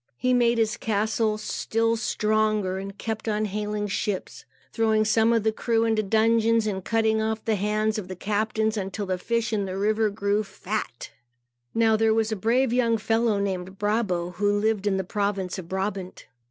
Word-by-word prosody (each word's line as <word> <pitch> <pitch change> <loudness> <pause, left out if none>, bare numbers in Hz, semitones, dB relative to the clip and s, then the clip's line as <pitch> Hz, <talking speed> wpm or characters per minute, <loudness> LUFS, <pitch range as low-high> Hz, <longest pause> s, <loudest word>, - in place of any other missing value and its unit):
He 255 0 +1
made 240 -1 +3
his 220 -1 +1
castle 220 -1 0
still 225 +1 0
stronger 215 -4 0
and 195 +1 -7
kept 220 0 -4
on 215 0 0
hailing 210 +1 -2
ships, 200 -1 -3 0.3
throwing 220 -1 +2
some 220 +1 +3
of 230 -2 +2
the 220 - +2
crews 225 0 0
into 220 -1 +2
dungeons 225 +2 +3
and 190 -3 -2
cutting 220 0 +1
off 220 0 -2
the 225 - +1
hands 215 +2 0
of 190 - -7
the 185 - -6
captains, 215 +3 -1
until 200 +1 -3
the 185 -1 -2
fish 230 +3 -1
in 205 -2 0
the 190 0 -4
river 215 +2 +2
grew 205 +1 0
fat. 200 - -5 0.6
Now 225 -1 +4
there 220 0 +3
was 225 0 +1
a - - 0
brave 235 +5 +1
young 235 -2 +2
fellow 225 0 +1
named 190 -1 -3
Brabo, 205 -5 0
who 205 +1 +2
lived 210 -1 0
in 195 -1 +2
the 190 - -1
province 195 -1 -2
of 170 -2 -9
Brabant. 190 -1 -4
215 Hz, 180 wpm, -25 LUFS, 200-225 Hz, 0.6 s, Now